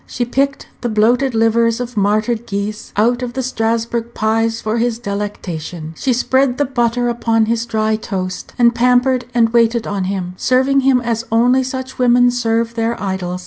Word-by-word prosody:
She 240 Hz, -, -2 dB
picked 275 Hz, +3 st, -1 dB
the 240 Hz, -, -2 dB
bloated 235 Hz, +4 st, +2 dB
livers 225 Hz, +1 st, +2 dB
of 245 Hz, -1 st, -5 dB
martyred 215 Hz, +3 st, 0 dB
geese 205 Hz, +1 st, -4 dB
out 240 Hz, +4 st, +2 dB
of 245 Hz, -1 st, -4 dB
the 260 Hz, +1 st, -2 dB
Strasburgh 230 Hz, -1 st, -2 dB
pies 225 Hz, +1 st, 0 dB
for 220 Hz, +1 st, -2 dB
his 235 Hz, -1 st, 0 dB
delectation; 180 Hz, -7 st, -5 dB
she 260 Hz, -, -1 dB
spread 260 Hz, +1 st, +1 dB
the 290 Hz, -, +1 dB
butter 245 Hz, -2 st, 0 dB
upon 230 Hz, -2 st, +1 dB
his 230 Hz, +1 st, -1 dB
dry 220 Hz, -1 st, 0 dB
toast, 185 Hz, -3 st, -5 dB
and 240 Hz, -1 st, +4 dB
pampered 250 Hz, +1 st, +2 dB
and 230 Hz, -1 st, +4 dB
waited 230 Hz, 0 st, +2 dB
on 200 Hz, -2 st, -2 dB
him, 185 Hz, -2 st, -3 dB
serving 260 Hz, +4 st, +2 dB
him 265 Hz, -2 st, +3 dB
as 230 Hz, -1 st, -2 dB
only 245 Hz, +3 st, +3 dB
such 260 Hz, 0 st, -5 dB
women 245 Hz, 0 st, +4 dB
serve 230 Hz, -1 st, 0 dB
their 230 Hz, 0 st, -2 dB
idols. 190 Hz, -2 st, -3 dB
230 Hz, 175 wpm, -17 LUFS, 215-245 Hz, -, and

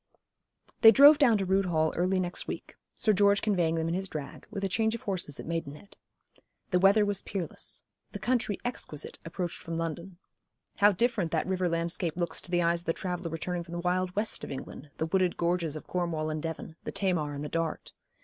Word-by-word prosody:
They 225 Hz, -, +11 dB
drove 285 Hz, +6 st, +8 dB
down 240 Hz, -7 st, +5 dB
to 195 Hz, -, -1 dB
Rood 190 Hz, +1 st, +2 dB
Hall 160 Hz, -3 st, +1 dB
early 185 Hz, +2 st, +1 dB
next 180 Hz, -1 st, -1 dB
week, -, -, -6 dB, 0.2 s
Sir 215 Hz, -, +3 dB
George 200 Hz, 0 st, +4 dB
conveying 175 Hz, -6 st, +1 dB
them 165 Hz, 0 st, -1 dB
in 165 Hz, -, -1 dB
his 190 Hz, +1 st, -2 dB
drag, 150 Hz, -3 st, -7 dB
with 200 Hz, -2 st, -5 dB
a -, -, +2 dB
change 220 Hz, +3 st, +1 dB
of 230 Hz, -, -8 dB
horses 180 Hz, -7 st, -2 dB
at -, -, -6 dB
Maidenhead. 165 Hz, +2 st, -5 dB, 0.8 s
The 180 Hz, -, +3 dB
weather 200 Hz, +3 st, +5 dB
was 205 Hz, -2 st, 0 dB
peerless; 185 Hz, -5 st, -4 dB, 0.3 s
the -, -, -5 dB
country 240 Hz, -5 st, 0 dB
exquisite, 155 Hz, -, -4 dB
approached 170 Hz, +1 st, -4 dB
from 165 Hz, 0 st, -5 dB
London. 170 Hz, +2 st, -4 dB, 0.6 s
How 205 Hz, 0 st, +6 dB
different 210 Hz, -3 st, +1 dB
that -, -, +1 dB
river 185 Hz, -1 st, 0 dB
landscape 170 Hz, 0 st, -1 dB
looks 175 Hz, -1 st, -1 dB
to -, -, -11 dB
the 175 Hz, -1 st, +2 dB
eyes 170 Hz, 0 st, +2 dB
of -, -, -18 dB
the 165 Hz, -, +2 dB
traveller 180 Hz, -1 st, -4 dB
returning 175 Hz, +2 st, -3 dB
from 170 Hz, 0 st, -10 dB
the 175 Hz, -, -3 dB
wild 180 Hz, +1 st, -1 dB
West 210 Hz, +2 st, +1 dB
of -, -, -6 dB
England, 135 Hz, +1 st, -8 dB
the 160 Hz, -, -1 dB
wooded 185 Hz, +1 st, +1 dB
gorges 170 Hz, -3 st, 0 dB
of 155 Hz, -, -7 dB
Cornwall 165 Hz, -3 st, -2 dB
and 155 Hz, 0 st, -3 dB
Devon, 160 Hz, 0 st, -6 dB
the -, -, -4 dB
Tamar 165 Hz, -7 st, 0 dB
and 145 Hz, +1 st, -5 dB
the -, -, -5 dB
Dart. 165 Hz, -1 st, -3 dB
180 Hz, 210 wpm, -29 LUFS, 165-195 Hz, 0.8 s, They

